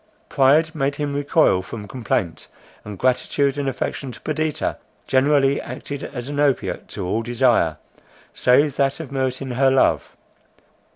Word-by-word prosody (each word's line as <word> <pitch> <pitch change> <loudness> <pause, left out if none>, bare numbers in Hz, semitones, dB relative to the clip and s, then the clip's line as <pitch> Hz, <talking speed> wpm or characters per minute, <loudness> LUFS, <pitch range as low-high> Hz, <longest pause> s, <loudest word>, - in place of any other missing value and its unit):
Pride 150 +4 +3
made 140 -2 -1
him 145 -1 -3
recoil 145 - +2
from 105 +2 -8
complaint; 100 -7 -2 0.4
and 105 -2 -8
gratitude 135 +4 +1
and 140 -1 -1
affection 135 0 -4
to 115 - -12
Perdita, 155 0 -2 0.3
generally 135 +1 +3
acted 140 +3 -7
as 125 -3 -6
an 145 0 -4
opiate 145 -3 0
to - - -6
all 110 +5 -1
desire, 120 - +2 0.6
save 140 +3 +3
that 135 +1 +1
of 160 -4 -7
meriting 130 -1 -2
her 135 +2 +3
love. 130 0 +2
135 Hz, 140 wpm, -21 LUFS, 125-145 Hz, 0.6 s, Pride